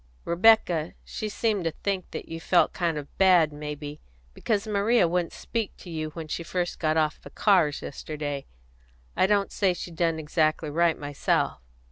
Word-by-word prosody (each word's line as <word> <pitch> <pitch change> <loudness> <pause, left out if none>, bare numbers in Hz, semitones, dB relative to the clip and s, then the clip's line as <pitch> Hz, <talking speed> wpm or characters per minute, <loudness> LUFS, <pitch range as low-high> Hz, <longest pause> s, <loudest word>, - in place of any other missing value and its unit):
"Rebecca 175 -3 +4
she 215 - -4
seemed 210 -2 0
to - - +2
think 190 +3 -3
that - - -7
you 165 - -6
felt 175 +1 +3
kind 170 -3 -1
of 145 -1 -8
bad, 180 -5 +5
may 150 0 -5
be, 145 0 -8 0.3
because 205 - -1
Maria 210 -1 +3
wouldn't 175 0 0
speak 225 -4 -4
to 175 - -11
you 155 -1 -3
when 165 -2 -6
she 155 - -3
first 175 +1 -3
got 155 -1 +1
off 155 -1 +1
the - - -11
cars 175 -8 +2
yesterday, 145 -1 -5 0.7
and - - +2
I - - +5
don't 200 -1 +2
say 190 -3 +1
she 175 - -7
done 165 0 0
exactly 155 0 0
right, 170 +1 +2
myself. 145 -1 -1
170 Hz, 180 wpm, -26 LUFS, 155-190 Hz, 0.7 s, bad